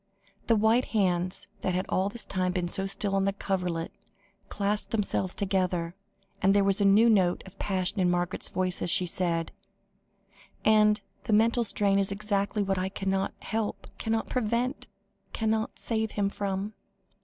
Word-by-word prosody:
The 230 - +4
white 220 +3 +3
hands 185 -2 +1 0.2
that 185 - 0
all 190 +2 +1
this 225 +2 -4
time 185 -1 -1
had 180 - 0
been 180 -1 0
so 195 +2 0
still 195 0 -1
on 195 0 +2
the 195 - +1
coverlet, 180 -4 -2 0.6
clasped 205 +1 -1
themselves 195 -4 -1
together, 180 -4 0 0.5
and 195 +1 +4
there 200 - +5
was 195 +1 +2
a - - +4
new 205 +4 +6
note 190 -6 +3
of 190 0 -14
passion 190 0 -1
in 180 -1 +3
Margaret's 175 +1 -1
voice, 185 -1 0
as - - 0
she 180 - +3
said 170 -1 -1 1.1
"And 215 -1 +5 0.2
the 220 - 0
mental 230 +3 +4
strain 200 -2 +2
is 195 0 0
exactly 205 0 -1
what 195 -1 0
I 185 +1 -1
cannot 195 0 -2
help, 220 -1 -4
cannot 225 0 -1
prevent, 245 +2 -1 0.5
cannot 220 0 -1
save 220 -1 -1
him 200 -1 +1
from." 200 +1 -3
195 Hz, 165 wpm, -28 LUFS, 185-215 Hz, 1.1 s, new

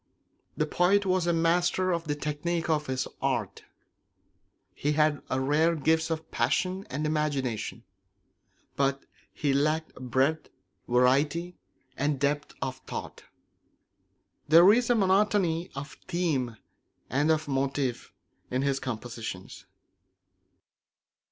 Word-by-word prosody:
The 155 - +2
poet 185 +6 +2
was 185 -2 +1
a - - +4
master 175 +2 +2
of 170 -1 -1
the 145 -1 -1
technique 160 +3 -2
of 150 -1 0
his 130 -1 -1
art; - - -2 1.1
he 150 +1 -1
had 150 -1 +2
rare 150 +6 +2
gifts 160 +2 +1
of 160 -1 -4
passion 185 +10 0
and 145 +4 -3
imagination; 140 -7 -2 0.9
but 135 0 0 0.3
he 145 -2 0
lacked 155 +3 0
breadth, 130 +5 0 0.4
variety, 140 +8 +2 0.4
and 145 0 0
depth 145 +1 -1
of 130 -1 -3
thought. - - -7 1.2
There 170 +6 +8
is 240 +1 +1
a 245 - +4
monotony 190 -4 +2
of 140 +1 -7
theme 150 -10 -1 0.5
and 145 +5 +1
of 155 -1 +1
motive 135 -2 -1 0.4
in 130 +2 -1
his 140 -1 +1
compositions. 115 -6 -6
150 Hz, 115 wpm, -28 LUFS, 135-170 Hz, 1.2 s, There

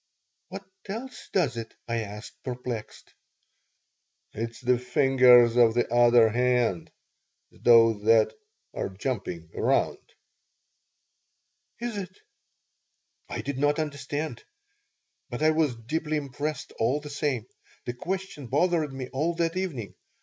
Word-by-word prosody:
"What 195 0 -8 0.2
else 235 +6 -7
does 145 - +1
it?" 115 -1 -7
I 115 0 -1
asked, 105 0 -8
perplexed 125 -3 -6 1.2
"It's 115 +2 -5
the 125 -1 +2
fingers 125 -2 +5
of 115 -2 +5
the 120 -1 0
other 120 -1 +6
hand, 120 -6 +1 0.6
those 115 -3 +5
that 110 -1 +5 0.4
are - - -3
jumping 95 -6 -4
around." - - +1 1.8
"Is 235 -2 -4
it?" 185 -2 -6 1.1
I - - -4
did 140 -1 -4
not 145 +1 +2
understand, 145 -2 -4 0.9
but 120 +5 -4
I 155 - +5
was 155 -5 +1
deeply 155 +7 -2
impressed 145 +1 -4
all 125 +6 +2
the 150 0 -9
same. 140 -6 -1 0.4
The 120 - -3
question 180 -1 -5
bothered 155 +2 +1
me 135 -1 -6
all 160 +6 0
that 165 0 0
evening. 160 - -3
130 Hz, 120 wpm, -27 LUFS, 115-155 Hz, 1.8 s, other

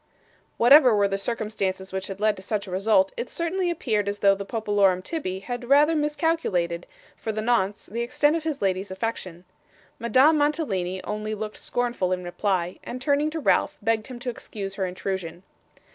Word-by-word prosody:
Whatever 250 0 +7
were 200 -1 +3
the 195 0 -2
circumstances 195 -3 -3
which 190 0 -3
had 195 0 -7
led 215 0 +2
to - - -9
such 205 +1 -2
a 190 - -9
result, 220 +10 +3
it 475 - -4
certainly 350 +2 -1
appeared 215 - 0
as 205 - -3
though 200 -1 +5
the 200 0 -4
popolorum 205 -5 +2
tibby 190 - -4
had 245 +3 -6
rather 295 +3 +5
miscalculated, 295 - 0 0.3
for 220 - -4
the 215 - -4
nonce, 215 -3 0
the 230 +4 -4
extent 290 +6 +2
of 330 - -2
his 310 -8 -3
lady's 190 +1 0
affection. 190 -3 -4 0.6
Madame 260 +7 +4
Mantalini 195 - -1
only 215 +2 -3
looked 215 0 -5
scornful 240 -7 -1
in 180 0 -1
reply; 180 0 -1
and, 250 - -6
turning 285 +3 +1
to 320 +1 -4
Ralph, 300 0 +2
begged 220 0 0
him 255 -2 -8
to 250 -1 -2
excuse 200 -4 -7
her 195 -1 -2
intrusion. 180 -2 -5
215 Hz, 180 wpm, -25 LUFS, 190-265 Hz, 0.6 s, Whatever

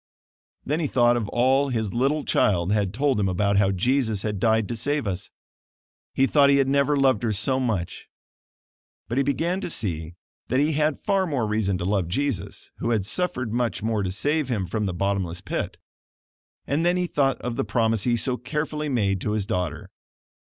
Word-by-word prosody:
Then 150 +4 0
he 160 - 0
thought 120 -2 +3
of 110 -4 -2
all 135 +3 +2
his 110 -5 -2
little 140 +5 0
child 90 -2 +2
had 105 -3 +1
told 135 +1 +1
him 100 -2 +1
about 100 +2 +1
how 100 -1 +4
Jesus 110 +1 +1
had 105 -3 -2
died 110 -1 +2
to 120 - -2
save 145 +5 0
us. 95 -1 -3 0.9
He 135 - +4
thought 140 0 +4
he 140 - +5
had 135 -1 +2
never 140 +1 +2
loved 130 -6 +3
her 115 - 0
so 120 +6 0
much. 110 -9 -3 1.0
But 120 +4 -1
he - - +3
began 170 +7 -1
to - - -4
see 85 - -3 0.3
that 130 - +1
he 150 +2 +2
had 150 0 0
far 195 -2 +2
more 135 -8 -1
reason 105 -3 0
to 90 - -4
love 95 -3 0
Jesus 130 0 -3
who - - -1
had 110 -5 +1
suffered 125 - -1
much 120 -3 -1
more 110 -1 0
to 95 -2 -2
save 145 +8 0
him 105 -6 -1
from 105 +2 -2
the 95 - -2
"bottomless 95 -2 -1
pit." 95 - -4 0.9
And 145 +4 0
then 175 +1 +2
he 180 - 0
thought 140 -5 +1
of 120 -1 -3
the - - 0
promise 110 0 +1
he 120 +2 +1
so 125 +2 0
carefully 150 +3 -3
made 100 -7 0
to 105 - -1
his 105 -2 -1
daughter. 90 -3 -3
120 Hz, 200 wpm, -24 LUFS, 100-140 Hz, 1.0 s, he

